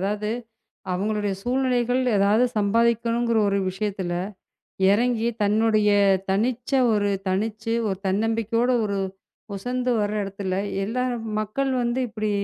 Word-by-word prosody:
அதாவது, 210 Hz, +2 st, -1 dB, 0.6 s
அவங்களுடைய 205 Hz, +1 st, -1 dB
சூழ்நிலைகள் 250 Hz, 0 st, +1 dB, 0.2 s
ஏதாவது 205 Hz, +5 st, +4 dB
சம்பாதிக்கணும்ங்கிற 230 Hz, +2 st, +2 dB
ஒரு 200 Hz, 0 st, +1 dB
விஷயத்துல 190 Hz, -2 st, -3 dB, 0.8 s
இறங்கி, 235 Hz, +2 st, +2 dB
தன்னுடைய 215 Hz, 0 st, +3 dB, 0.4 s
தனிச்ச 235 Hz, +6 st, 0 dB, 0.2 s
ஒரு 205 Hz, -1 st, +1 dB, 0.2 s
தனிச்சு 220 Hz, +4 st, -1 dB
ஒரு 190 Hz, -1 st, -2 dB
தன்னம்பிக்கையோட 225 Hz, +4 st, +1 dB
ஒரு 200 Hz, -1 st, -1 dB, 0.6 s
உசந்து 250 Hz, +4 st, -2 dB
வர 205 Hz, 0 st, 0 dB
இடத்துல, 195 Hz, -1 st, -4 dB, 0.3 s
எல்லா 250 Hz, +4 st, -1 dB, 0.4 s
மக்கள் 265 Hz, +6 st, -1 dB
வந்து 240 Hz, +2 st, 0 dB
இப்படி 215 Hz, -1 st, -3 dB
215 Hz, 105 wpm, -24 LUFS, 200-235 Hz, 0.8 s, ஏதாவது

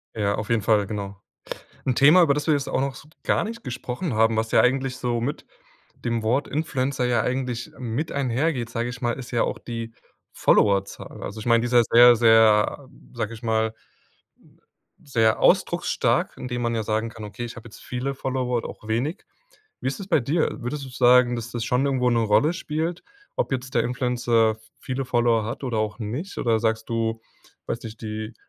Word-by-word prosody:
Ja, 100 Hz, -2 st, 0 dB
auf 105 Hz, +1 st, -5 dB
jeden 115 Hz, -2 st, +2 dB
Fall, 105 Hz, -1 st, +2 dB
genau. 100 Hz, -2 st, -6 dB, 0.6 s
'N 130 Hz, -, +1 dB
Thema, 150 Hz, +8 st, +7 dB
über 155 Hz, -5 st, +4 dB
das 145 Hz, +1 st, -3 dB
wir 155 Hz, -, +4 dB
jetzt 140 Hz, -2 st, -1 dB
auch -, -, 0 dB
noch 135 Hz, -1 st, -2 dB
so 140 Hz, -, -13 dB, 0.2 s
gar -, -, +1 dB
nicht 230 Hz, +2 st, -6 dB
gesprochen 125 Hz, +5 st, -4 dB
haben, 110 Hz, +1 st, +3 dB
was 110 Hz, 0 st, -1 dB
ja -, -, +6 dB
eigentlich 130 Hz, 0 st, +1 dB
so 120 Hz, -1 st, -1 dB
mit 140 Hz, +6 st, -3 dB, 0.5 s
dem 115 Hz, -1 st, -2 dB
Wort 125 Hz, +6 st, +1 dB
Influencer 135 Hz, -3 st, -1 dB
ja 120 Hz, -2 st, +2 dB
eigentlich 125 Hz, -2 st, -3 dB
mit 125 Hz, +5 st, -3 dB
einhergeht, 130 Hz, -1 st, -1 dB
sage 120 Hz, 0 st, -2 dB
ich 125 Hz, 0 st, -8 dB
mal, 120 Hz, -1 st, 0 dB
ist 125 Hz, -1 st, -8 dB
ja 120 Hz, -, +2 dB
auch -, -, -3 dB
die 115 Hz, -1 st, -6 dB, 0.4 s
Followerzahl. 100 Hz, -1 st, +1 dB
Also, 105 Hz, +2 st, -6 dB
ich 110 Hz, -, -8 dB
meine, 115 Hz, -1 st, +4 dB
die 120 Hz, -, -1 dB
ist 125 Hz, -, -5 dB
ja 120 Hz, -, +7 dB
sehr, 120 Hz, +1 st, +8 dB
sehr, 110 Hz, +3 st, +4 dB, 0.3 s
sage 115 Hz, -2 st, -3 dB
ich 115 Hz, +1 st, -11 dB
mal 110 Hz, -1 st, 0 dB, 1.3 s
sehr 115 Hz, -5 st, +2 dB
ausdrucksstark, -, -, +2 dB
indem 125 Hz, -1 st, -4 dB
man 115 Hz, 0 st, 0 dB
ja 110 Hz, -, -1 dB
sagen 110 Hz, +2 st, -1 dB
kann: 110 Hz, -1 st, -10 dB
„Okay, 105 Hz, +3 st, -6 dB
ich 115 Hz, -, -8 dB
habe 115 Hz, 0 st, -10 dB
jetzt 110 Hz, -, -14 dB
viele 130 Hz, +2 st, -3 dB
Follower 130 Hz, -2 st, -1 dB
oder 115 Hz, -, -4 dB
auch 110 Hz, -, -11 dB
wenig.“ 130 Hz, -, -2 dB, 0.6 s
Wie -, -, -2 dB
ist 135 Hz, -, -2 dB
das 195 Hz, -, -7 dB
bei 170 Hz, -6 st, +3 dB
dir? 150 Hz, +4 st, -1 dB
Würdest 135 Hz, +3 st, -4 dB
du -, -, -9 dB
sagen, 125 Hz, -1 st, +4 dB
dass 120 Hz, +1 st, -6 dB
das 120 Hz, -2 st, -3 dB
schon 125 Hz, +3 st, +1 dB
irgendwo 130 Hz, -2 st, +1 dB
'ne 115 Hz, -, +2 dB
Rolle 110 Hz, +8 st, +3 dB
spielt, 165 Hz, +1 st, -3 dB, 0.3 s
ob -, -, -1 dB
jetzt 130 Hz, 0 st, -3 dB
der -, -, +3 dB
Influencer 120 Hz, -3 st, +1 dB, 0.2 s
viele 130 Hz, +1 st, -4 dB
Follower 120 Hz, -3 st, +2 dB
hat 120 Hz, +6 st, -5 dB
oder 120 Hz, -4 st, -1 dB
auch 105 Hz, -1 st, -2 dB
nicht? 125 Hz, -, -5 dB
Oder 115 Hz, -2 st, +1 dB
sagst 110 Hz, 0 st, -1 dB
du, 115 Hz, -1 st, -1 dB, 0.4 s
weiß 115 Hz, -, -4 dB
nicht, 110 Hz, -1 st, -9 dB
die 110 Hz, 0 st, -5 dB
120 Hz, 200 wpm, -24 LUFS, 110-130 Hz, 1.3 s, sehr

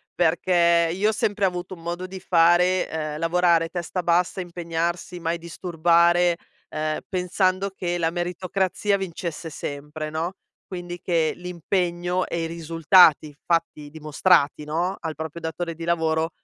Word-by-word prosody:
perché 170 Hz, 0 st, +3 dB
io 205 Hz, +4 st, +1 dB
ho -, -, +2 dB
sempre 205 Hz, -1 st, -1 dB
avuto 180 Hz, 0 st, -3 dB
un 165 Hz, -, -16 dB
modo 175 Hz, +2 st, -4 dB
di 190 Hz, 0 st, -8 dB
fare, 180 Hz, +1 st, +3 dB, 0.3 s
uhm, 150 Hz, -, -6 dB
lavorare, 170 Hz, 0 st, +3 dB
testa 175 Hz, +1 st, -4 dB
bassa, 175 Hz, +2 st, +1 dB
impegnarsi, 175 Hz, 0 st, -3 dB
mai 165 Hz, 0 st, -1 dB
disturbare, 170 Hz, 0 st, +2 dB, 0.3 s
uhm, 155 Hz, 0 st, -2 dB
pensando 185 Hz, +1 st, 0 dB
che 175 Hz, -2 st, -3 dB
la 165 Hz, -1 st, +1 dB
meritocrazia 185 Hz, +3 st, -1 dB
vincesse 170 Hz, -3 st, -5 dB
sempre, 150 Hz, +1 st, -6 dB
no, 165 Hz, +4 st, -3 dB, 0.3 s
quindi 175 Hz, -1 st, -7 dB
che 165 Hz, -3 st, +1 dB
l'impegno 180 Hz, 0 st, -1 dB
e 170 Hz, -1 st, -2 dB
i -, -, -1 dB
risultati 165 Hz, -2 st, +4 dB
fatti, 165 Hz, -3 st, -1 dB
dimostrati, 150 Hz, 0 st, +2 dB
no, 170 Hz, +5 st, -1 dB
al 160 Hz, -1 st, -4 dB
proprio 160 Hz, +2 st, -6 dB
datore 165 Hz, +1 st, -4 dB
di 165 Hz, -, -8 dB
lavoro, 160 Hz, -1 st, +1 dB
170 Hz, 140 wpm, -24 LUFS, 165-180 Hz, 0.3 s, risultati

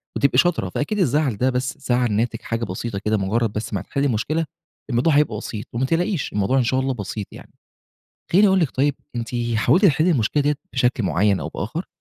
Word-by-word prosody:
وتبقي 140 Hz, -3 st, +2 dB
شاطرة، 160 Hz, -, +2 dB
فأكيد 205 Hz, -, -2 dB
الزعل 145 Hz, -, +1 dB
ده 130 Hz, +3 st, +2 dB
بس 125 Hz, +1 st, -2 dB
زعل 125 Hz, -4 st, +1 dB
ناتج 115 Hz, +3 st, -1 dB
حاجة 115 Hz, 0 st, -3 dB
بسيطة 100 Hz, +2 st, -4 dB
كده، 110 Hz, 0 st, +2 dB
مجرد 105 Hz, +3 st, 0 dB
بس 105 Hz, 0 st, -4 dB
ما 95 Hz, -, -1 dB
هتحلّي 140 Hz, +7 st, -2 dB
المشكلة، 140 Hz, +7 st, 0 dB, 0.4 s
الموضوع 130 Hz, +6 st, +2 dB
هيبقى 145 Hz, -7 st, +2 dB
بسيط، 105 Hz, -1 st, -6 dB
وما 125 Hz, +3 st, 0 dB
تقلقيش، 170 Hz, +2 st, -1 dB
الموضوع 105 Hz, +6 st, +1 dB
إن 130 Hz, -, +3 dB
شاء 130 Hz, +2 st, +1 dB
الله 135 Hz, 0 st, 0 dB
بسيط 105 Hz, -2 st, -5 dB
يعني. -, -, -13 dB, 0.8 s
خلّيني 200 Hz, +4 st, +6 dB
أقول 190 Hz, 0 st, +3 dB
لكِ، 160 Hz, -6 st, +1 dB
طيب 140 Hz, +1 st, +1 dB, 0.2 s
أنتِ 115 Hz, -1 st, -3 dB, 0.3 s
حاولتِ 150 Hz, -, +4 dB
تحلّي 160 Hz, +2 st, +4 dB
المشكلة 140 Hz, +2 st, +1 dB
ديّة 145 Hz, 0 st, +2 dB, 0.2 s
بشكل 125 Hz, -3 st, +1 dB
معين 95 Hz, +3 st, +2 dB
أو -, -, -4 dB
بآخر؟ 155 Hz, -, -5 dB
125 Hz, 200 wpm, -22 LUFS, 110-150 Hz, 0.8 s, خلّيني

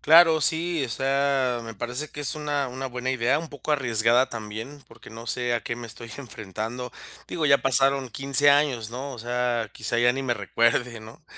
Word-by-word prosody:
Claro, 165 Hz, 0 st, +6 dB
sí, 165 Hz, +1 st, +2 dB
o -, -, -5 dB
sea, 135 Hz, -1 st, 0 dB
me 115 Hz, -1 st, -8 dB
parece 125 Hz, +8 st, -4 dB
que 145 Hz, -, -8 dB
es 145 Hz, -, -2 dB
una 145 Hz, -2 st, -2 dB
una 130 Hz, +2 st, -5 dB
buena 125 Hz, 0 st, -3 dB
idea, 120 Hz, +1 st, +1 dB
un 160 Hz, 0 st, -7 dB
poco 145 Hz, +1 st, -7 dB
arriesgada 120 Hz, -3 st, +3 dB
también, 115 Hz, +6 st, -7 dB
porque 115 Hz, -1 st, -15 dB
no 115 Hz, +1 st, -10 dB
sé 120 Hz, -1 st, 0 dB
a 120 Hz, -, 0 dB
qué 115 Hz, -, -4 dB
me 120 Hz, -1 st, -7 dB
estoy 115 Hz, +1 st, -11 dB
enfrentando. 115 Hz, +1 st, -6 dB, 0.4 s
Digo, 160 Hz, -3 st, -1 dB
ya 140 Hz, -1 st, +6 dB
pasaron 135 Hz, 0 st, +2 dB
15 140 Hz, +3 st, +4 dB
años, 140 Hz, -6 st, +2 dB
¿no?, 135 Hz, +3 st, -6 dB
o 120 Hz, -, -9 dB
sea, 120 Hz, -1 st, -1 dB
quizá 115 Hz, +2 st, -2 dB
ya 120 Hz, +1 st, +4 dB
ni 135 Hz, +1 st, -3 dB
me 120 Hz, -, 0 dB
recuerde, 115 Hz, +1 st, +1 dB
¿no? 115 Hz, +9 st, -14 dB
125 Hz, 200 wpm, -25 LUFS, 115-140 Hz, 0.4 s, Claro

